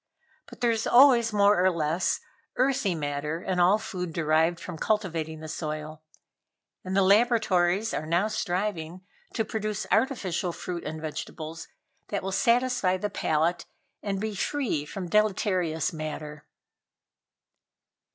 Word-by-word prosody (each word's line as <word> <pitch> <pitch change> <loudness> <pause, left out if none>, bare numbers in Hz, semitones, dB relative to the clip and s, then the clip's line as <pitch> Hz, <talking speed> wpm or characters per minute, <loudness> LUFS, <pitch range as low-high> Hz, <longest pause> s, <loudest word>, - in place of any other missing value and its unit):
But - - -14
there 240 -1 +3
is 225 -1 -1
always 240 -3 +6
more 200 -3 +4
or 185 - +5
less 165 0 0 0.3
earthy 255 -7 +1
matter 150 +1 -3
in 185 -1 -1
all 180 +4 +5
food 180 -6 -5
derived 160 +1 +2
from 170 -3 -7
cultivating 165 -7 -1
the 160 - -7
soil, 155 -1 -5 0.8
and 190 +1 -2
the 195 - +5
laboratories 205 -2 +3
are 155 - -3
now 175 +6 +2
striving 185 -4 -2 0.3
to 225 - 0
produce 215 -2 -3
artificial 195 -6 0
fruit 175 0 -6
and 160 - -5
vegetables 160 +1 -6 0.4
that 200 - -3
will 195 - -3
satisfy 235 -2 +2
the 205 +2 -3
palate 165 +3 0 0.3
and 195 -2 -2
be 215 +1 -3
free 205 - -1
from 180 +4 -6
deleterious 185 -6 +1
matter." 150 -1 -6
185 Hz, 130 wpm, -27 LUFS, 160-215 Hz, 0.8 s, always